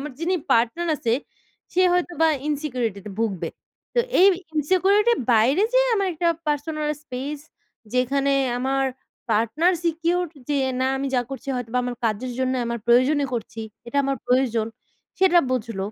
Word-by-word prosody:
আমার 295 +1 -6
যিনি 355 +3 +1 0.2
পার্টনার 240 +9 +2
আছে, 230 -4 -1 0.6
সে 370 - +3
হয়তো 355 0 0
বা 325 - +6 0.2
ইনসিকিউরিটি 255 -9 -2
তে - - -5
ভুগবে। 215 -6 -1 0.5
তো - - +1 0.2
এই 380 - +8 0.3
ইনসিকিউরিটি 375 +8 +3
এর - - -4
বাইরে 245 - +4
যে, - - +6 0.2
আমার 395 -3 +1
একটা 340 +1 0 0.2
পার্সোনাল 300 +1 -1
স্পেস 280 +2 -5 0.6
যেখানে 275 +2 +1 0.3
আমার 270 +1 0 0.5
পার্টনার 230 - +2
সিকিউরড 340 +1 0 0.2
যে, 290 - +1 0.2
না, 260 - +2
আমি 275 +1 -2
যা 250 - +3
করছি 270 0 -7
হয়তো 240 -2 -5
বা - - +3
আমার 245 -1 -4
কাজের 230 +3 -1
জন্য 260 0 0
আমার 235 0 -2
প্রয়োজনে 255 +5 +4
করছি। 225 -1 -5 0.3
এটা 235 - -5
আমার 275 0 0
প্রয়োজন 245 -3 +2 0.5
সেটা 370 -2 +5
বুঝল। 230 -5 -2
270 Hz, 160 wpm, -23 LUFS, 240-325 Hz, 0.6 s, এই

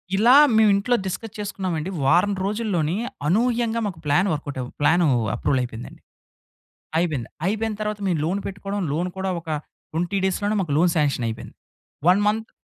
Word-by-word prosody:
ఇలా 235 +6 +5 0.2
మేమింట్లో 215 +2 +4
డిస్కస్ 210 +3 -5
చేసుకున్నామండి, 185 -5 -3
వారం 175 +8 +3
రోజుల్లోని 195 -6 -1 0.3
అనూహ్యంగా 230 +4 +1
మాకు 180 -5 -4
ప్లాన్ 160 +7 +3
వర్కౌటవ్ 140 -4 -4
ప్లానూ 170 +3 +4 0.3
అప్రూవలయిపోయిందండి. 125 -4 -2 1.0
అయిపోయింద, 155 -8 -1 0.2
అయిపోయిన 220 +3 0
తరువాత 210 -1 -2
మేము 170 -5 +1
లోన్ 185 +5 -1
పెట్టుకోడం, 200 +1 -4
లోన్ 175 +4 -1
కూడా 190 0 -2
ఒక 165 - -11 0.4
20 175 +5 -1
డేస్‌ 190 - 0
లోనే 210 +1 +1
మాకు 155 -6 -2
లోన్ 175 +2 +4
సాంక్షనయిపోయింది. 125 -6 -1 0.5
1 190 +3 +5
మంత్ 220 +1 0
185 Hz, 140 wpm, -23 LUFS, 155-210 Hz, 1.0 s, ఇలా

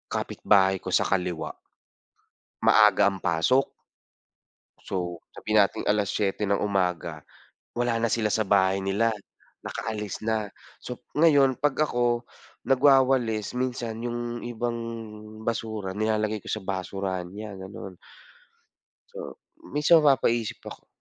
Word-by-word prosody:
Kapitbahay 95 -2 +2
ko - - -4
sa - - +3
kaliwa 90 -4 -2 1.1
maaga 105 -2 +6
ang 100 - -6
pasok. 90 +10 +1 1.1
So, 90 -3 -4 0.2
sabihin 110 0 +1
nating 100 - +2
7:00 105 0 0
ng 100 0 +1
umaga, 95 -4 -1 0.6
wala 120 -1 +1
na 115 - +1
sila 110 -2 +1
sa 110 - +2
bahay 95 -1 +2
nila, 105 +4 +1 0.5
nakaalis 105 -3 -4
na. 110 -2 -1 0.3
So 125 - -6 0.2
ngayon, 145 -4 +5
'pag 145 +3 0
ako 120 -1 0 0.4
nagwawalis, 130 -5 +3
minsan 120 -3 -3
yung 120 0 -4
ibang 120 0 -3 0.7
basura 110 -4 -3
nilalagay 110 -1 0
ko - - -6
sa 110 - -3
basurahan 95 -1 -3
niya, 105 0 -7
gano'n. 95 0 -9 1.2
So, - - -8 0.2
minsan 150 +3 +4
mapapaisip 120 -6 +2
ako, - - -10
110 Hz, 115 wpm, -26 LUFS, 95-120 Hz, 1.2 s, maaga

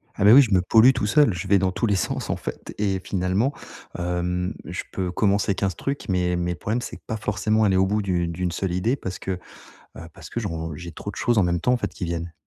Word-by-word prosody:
Ah - - -1
bah, 105 - +8
oui, 140 +3 +9
je 110 -6 -1
me 90 - +5
pollue 110 +7 +6
tout 105 - -2
seul, 120 0 +4
je 90 +2 -5
vais 100 +1 +5
dans 95 -1 +1
tous 115 +4 -1
les 100 - +2
sens 90 - -2
en - - +1
fait - - -7
et 100 -2 0
finalement, 95 +7 0 0.5
hem, 90 +2 -1
je 90 +1 -5
peux 90 -2 -2
commencer 100 +1 +1
15 95 -3 -1
trucs, 140 +9 -4
mais 90 -2 +1
mais 90 0 -1
le 85 - -5
problème, 110 +7 -2
c'est 115 - -7
que - - -25
pas 110 - -2
forcément 105 +1 0
aller 95 -3 +3
au 95 0 +3
bout 105 +1 0
du 90 -3 0
d'1 85 +1 -2
seule 90 +1 -2
idée 115 +9 +1
parce 95 -8 -6
que, 95 - -4
heu, 90 -1 -8 0.5
parce - - -12
que - - -4
je 115 - -2
ron 80 -3 -4
j'ai 85 +1 -8
trop 100 - -6
de 95 - -13
choses 120 -2 +1
en 100 - +5
même 85 -1 0
temps 125 - +2
en 125 - +2
fait - - -2
qui 105 - -4
viennent. 85 0 -4
95 Hz, 275 wpm, -24 LUFS, 90-105 Hz, 0.5 s, oui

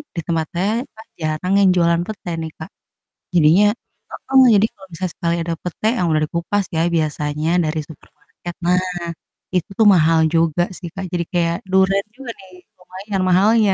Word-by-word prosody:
di 165 - -2
tempat 160 -2 -1
saya 195 +4 +1 0.2
kan 220 - -14
jarang 155 +4 -1
yang 195 -2 +5
jualan 170 -1 +3
pete 210 -4 -7
nih 160 -1 -5
Kak. 165 +5 -8 0.7
Jadinya 170 +5 +5 0.4
heeh, 270 0 +2
jadi 205 +2 +4
kalau 190 -1 -15
misal 185 +2 -3
sekali 170 -2 -1
ada 165 0 -2
pete, 180 +5 -2
yang 180 - +1
udah 155 0 +2
dikupas 180 +5 -1
ya 165 - +2
biasanya 150 0 -1
dari 155 0 -1
supermarket, 170 +3 -12
nah, 180 +1 +4 0.8
itu 195 +5 -1
mahal 165 -5 +5
juga 165 +1 +2
sih 175 -2 -7
Kak. 190 0 -4
Jadi 170 -1 0
kayak 170 -1 +1
duren 190 +1 +3
juga 260 -3 -7
nih 190 -1 -15 0.3
lumayan 190 +2 -5
mahalnya, 205 +3 +4
175 Hz, 165 wpm, -19 LUFS, 165-195 Hz, 0.8 s, yang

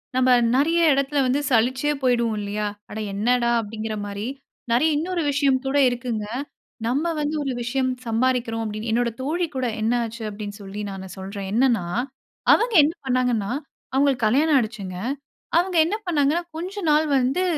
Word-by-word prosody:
நம்ம 255 0 +3 0.3
நெறைய 325 +5 +3
எடத்தில 275 +1 +1
வந்து 270 +3 +2
சலிச்சே 260 +5 +2
போய்விடுவோம் 235 -4 +1
இல்லையா? 205 +1 -2 0.2
"அட 220 - -5
என்னடா!" 235 +3 +2
அப்படிங்கிற 215 0 -5
மாரி. 205 +3 -4 0.4
நெறைய 305 +7 +4
இன்னொரு 345 +2 -1
விஷயம் 275 -2 +2
கூட 270 +2 +1
இருக்குங்க. 240 -3 -3 0.6
நம்ம 300 +7 0
வந்து 295 +1 -1
ஒரு 270 - -2
விஷயம் 255 +1 0
சம்பாறிக்கிறோம் 230 -1 0
அப்படினு 215 +2 -4
என்னோட 235 +1 +2
தோழி 335 +6 0
கூட 260 -1 -1 0.2
என்ன 225 +2 +1
ஆச்சு 225 0 -7
அப்படின்னு 205 0 -7
சொல்லி 200 +1 -6
நான் 190 -1 -8
சொல்றேன். 195 0 -6
என்னென்னா, 235 -6 +3 0.7
அவங்க 470 -1 +2
என்ன 310 +3 +1
பண்ணாங்கன்னா, 245 -5 +1 0.4
அவுங்களுக்கு 270 -4 +2
கல்யாணம் 290 +6 +3
ஆயிடுச்சுங்க. 210 -6 -3 0.6
அவுங்க 355 0 +1
என்ன 400 +6 -1
பண்ணாங்கன்னா, 310 +1 +2
கொஞ்ச 380 +4 -5
நாள் 305 +1 +3
வந்து 270 +9 +1
250 Hz, 150 wpm, -23 LUFS, 220-285 Hz, 0.7 s, நெறைய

